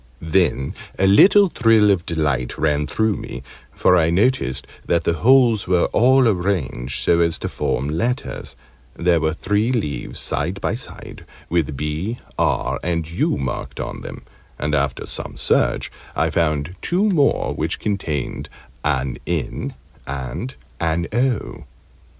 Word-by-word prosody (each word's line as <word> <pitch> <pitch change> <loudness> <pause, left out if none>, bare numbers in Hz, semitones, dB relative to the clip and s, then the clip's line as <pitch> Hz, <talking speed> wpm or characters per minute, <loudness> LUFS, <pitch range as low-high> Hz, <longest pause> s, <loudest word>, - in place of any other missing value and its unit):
Then 85 -8 +2 0.2
a 95 - +2
little 195 - +7
thrill 115 -6 +4
of 90 -4 0
delight 75 -7 -1
ran 75 -1 +1
through 110 -2 0
me 65 - -7 0.3
for 90 - +3
I 80 -2 +3
noticed 85 - +1 0.2
that 85 -1 +2
the 85 - +1
holes 115 +2 +4
were 90 -1 +3
all 130 +2 +5
arranged 90 - -1
so 85 - +3
as 85 -1 +2
to - - -4
form 65 - -2
letters; 90 - -3 0.4
there 85 -1 +2
were 80 0 0
three 105 +7 0
leaves 75 - -3
side 90 +6 -1
by - - -1
side, 120 - -8 0.3
with 75 -5 0
"B," 80 - -3 0.2
"R," - - +1
and 85 -2 -1
"U" 85 - 0
marked 65 -2 -4
on - - -5
them, - - -8 0.3
and 75 +2 -2
after 70 -2 0
some - - -4
search - - +1 0.2
I - - +1
found 75 0 0
two 190 +5 +1
more, 155 -9 +2
which - - -2
contained 85 - -3 0.3
an 70 -3 -1
"N" 85 -7 -3 0.3
and 70 - -5 0.2
an 85 +1 0
"O." 125 -1 -1
85 Hz, 145 wpm, -21 LUFS, 75-110 Hz, 0.4 s, little